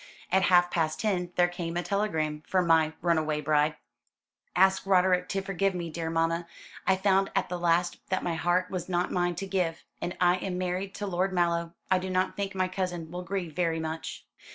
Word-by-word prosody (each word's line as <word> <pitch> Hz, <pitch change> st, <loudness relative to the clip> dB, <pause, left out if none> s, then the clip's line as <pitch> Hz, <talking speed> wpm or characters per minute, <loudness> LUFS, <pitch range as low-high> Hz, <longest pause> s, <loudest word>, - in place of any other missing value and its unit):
"At 190 Hz, +1 st, +4 dB
half 175 Hz, -1 st, +5 dB
past 160 Hz, -2 st, 0 dB
ten 180 Hz, -5 st, 0 dB
there 175 Hz, 0 st, +4 dB
came 175 Hz, -1 st, -4 dB
a 175 Hz, -, -1 dB
telegram 160 Hz, -8 st, -1 dB
from 185 Hz, -2 st, +2 dB
my 160 Hz, -1 st, +4 dB
runaway 155 Hz, -3 st, +1 dB
bride: 150 Hz, 0 st, +2 dB, 0.8 s
"'Ask 190 Hz, +1 st, +4 dB
Roderick 180 Hz, -1 st, +3 dB
to 195 Hz, 0 st, -1 dB
forgive 195 Hz, 0 st, 0 dB
me, 170 Hz, -2 st, -4 dB
dear 165 Hz, 0 st, -3 dB
mamma. 165 Hz, +1 st, 0 dB, 0.4 s
I 190 Hz, -, +5 dB
found 195 Hz, 0 st, +2 dB
at -, -, +1 dB
the 180 Hz, 0 st, -3 dB
last 175 Hz, 0 st, +2 dB
that 185 Hz, -, 0 dB
my 175 Hz, -, -1 dB
heart 175 Hz, +3 st, +1 dB
was 185 Hz, -1 st, -4 dB
not 175 Hz, 0 st, 0 dB
mine 175 Hz, -1 st, 0 dB
to 195 Hz, -, -4 dB
give, 180 Hz, -4 st, -1 dB, 0.2 s
and 175 Hz, -, -3 dB
I 180 Hz, 0 st, +4 dB
am 180 Hz, 0 st, -3 dB
married 185 Hz, +2 st, -2 dB
to 205 Hz, -, -4 dB
Lord 190 Hz, 0 st, 0 dB
Mallow. 170 Hz, -1 st, 0 dB, 0.2 s
I 185 Hz, -, +5 dB
do 185 Hz, +1 st, -4 dB
not 185 Hz, 0 st, 0 dB
think 200 Hz, -1 st, -3 dB
my 185 Hz, -1 st, +1 dB
cousin 180 Hz, -3 st, -3 dB
will 180 Hz, +1 st, -4 dB
grieve 180 Hz, -3 st, -4 dB
very 165 Hz, -2 st, +1 dB
much.' 160 Hz, 0 st, -5 dB
180 Hz, 200 wpm, -28 LUFS, 165-185 Hz, 0.8 s, half